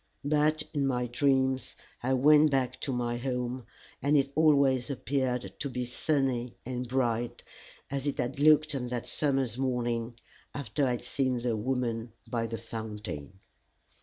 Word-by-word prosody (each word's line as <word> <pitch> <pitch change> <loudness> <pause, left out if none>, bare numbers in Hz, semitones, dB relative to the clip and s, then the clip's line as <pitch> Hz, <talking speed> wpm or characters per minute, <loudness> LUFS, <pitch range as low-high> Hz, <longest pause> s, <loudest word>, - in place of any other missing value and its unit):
But 155 +1 +2
in 140 -2 +1
my 125 -2 0
dreams 130 +1 +1 0.3
I 130 +2 +1
went 150 +3 +6
back 135 -3 0
to 140 - -2
my 120 -1 -1
home, 125 -1 -3 0.3
and 145 +3 +4
it 135 0 +1
always 140 -5 +4
appeared 130 -2 -1
to 140 - -2
me 125 -1 -3
sunny 125 -2 0
and 125 0 -3
bright, 120 -2 0 0.5
as 140 0 -2
it 145 - -1
had 130 0 -2
looked 155 +1 +5
on 125 -3 -2
that 120 -1 -3
summer's 135 -5 0
morning 120 -2 -1 0.4
after 140 0 -1
I - - +1
had 120 - -4
seen 130 -2 0
the 120 -1 0
woman 115 -1 -2
by 115 -1 -1
the 115 0 -4
fountain. 105 -6 -7
130 Hz, 155 wpm, -30 LUFS, 120-140 Hz, 0.5 s, went